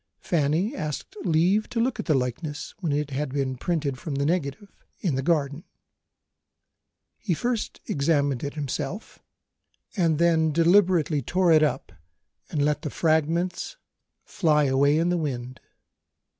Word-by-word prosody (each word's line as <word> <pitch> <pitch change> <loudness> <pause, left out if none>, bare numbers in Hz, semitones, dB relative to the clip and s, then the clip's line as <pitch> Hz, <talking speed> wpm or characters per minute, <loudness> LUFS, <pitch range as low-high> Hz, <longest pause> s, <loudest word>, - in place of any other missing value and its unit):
Fanny 170 - 0
asked 150 - -5
leave 180 +5 +2
to 235 - -2
look 235 -1 0
at - - -4
the 155 - +3
likeness 140 +4 -3
when 170 -6 -1
it 145 0 -1
had 135 0 -2
been 135 -1 -1
"printed" 145 -2 -2
from 150 0 -4
the 140 +1 0
negative, 165 +3 -2 0.3
in 175 -7 0
the 130 - 0
garden. 145 0 0 1.6
He 185 -7 -1
first 240 +3 -2
examined 140 -3 +1
it 140 +1 -4
himself 150 - -4 0.8
and 165 -6 +2
then 160 -1 +3
deliberately 170 -3 +3
tore 180 +6 +2
it 155 -1 +6
up 140 -3 0 0.6
and 145 -3 0
let 150 -1 0
the 150 - -3
fragments 165 - 0 0.5
fly 155 -5 +2
away 140 +2 +3
in 165 +2 +2
the 175 - +1
wind. 130 -4 -4
155 Hz, 145 wpm, -25 LUFS, 140-175 Hz, 1.6 s, it